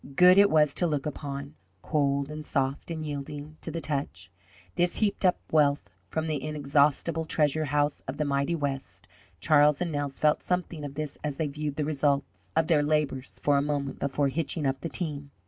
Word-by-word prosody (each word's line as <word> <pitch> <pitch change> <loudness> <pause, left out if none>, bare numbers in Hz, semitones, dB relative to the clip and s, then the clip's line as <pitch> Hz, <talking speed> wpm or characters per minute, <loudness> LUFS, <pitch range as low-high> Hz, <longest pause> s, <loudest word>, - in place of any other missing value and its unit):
Good 180 +3 +7
it 200 0 +7
was 150 -2 +4
to 175 - 0
look 150 -2 -1
upon, 140 -1 -5 0.3
cold 140 -1 0
and 155 0 -6
soft 135 0 -1
and 160 -2 -4
yielding 145 +1 -6
to - - -4
the 165 - -3
touch, 135 - -3 0.4
this 175 0 +1
heaped 205 -2 0
up 180 -1 +3
wealth 145 -2 +2 0.2
from 160 0 -2
the 155 -3 -2
inexhaustible 150 +2 +1
treasure 155 0 +1
house 145 0 0
of 135 - -4
the 150 - 0
mighty 140 +4 0
West. 135 - -4 0.3
Charlie 150 -2 +5
and 175 -2 -1
Nels 145 -2 -3
felt 150 -1 +3
something 180 -4 -2
of 140 -1 -6
this 150 -1 -5
as 150 -2 -3
they 160 - 0
viewed 145 0 -4
the 150 - -1
results 145 -2 -1
of 160 0 +3
their 155 -3 +3
labours 145 -3 -1
for 145 -1 +4
a - - +3
moment 145 -1 -2
before 140 0 0
hitching 155 +1 -2
up 135 0 0
the 165 - -3
team. 145 -6 -4
150 Hz, 195 wpm, -28 LUFS, 140-155 Hz, 0.4 s, Good